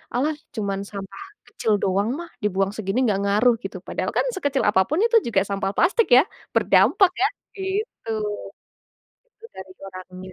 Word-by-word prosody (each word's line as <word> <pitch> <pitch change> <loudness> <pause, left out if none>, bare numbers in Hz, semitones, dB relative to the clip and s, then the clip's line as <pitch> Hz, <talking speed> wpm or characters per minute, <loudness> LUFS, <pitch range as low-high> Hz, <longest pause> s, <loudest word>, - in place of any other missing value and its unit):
"Alah, 295 +5 +1 0.2
cuman 200 -3 -2
sampah 195 - -8 0.3
kecil 220 - -2
doang 195 +3 +1
mah, 340 -1 -8
dibuang 195 -1 +1
segini 200 0 -3
nggak 205 -4 +1
ngaruh." 210 +5 +4
Gitu. - - -6
Padahal - - -2
kan, - - +2
sekecil 285 -7 0
apa 190 - +4
pun 310 - 0
itu 470 - +1
juga 205 -5 +2
sampah 195 -1 -1
plastik, 410 +6 +3
ya, 260 - +7 0.3
berdampak 385 -3 +4
ya, 400 - +5 0.3
gitu. 385 - -4 1.3
Itu 460 - -21
dari 190 0 -10 0.2
orangnya. 185 0 -10
210 Hz, 155 wpm, -23 LUFS, 195-315 Hz, 1.3 s, ya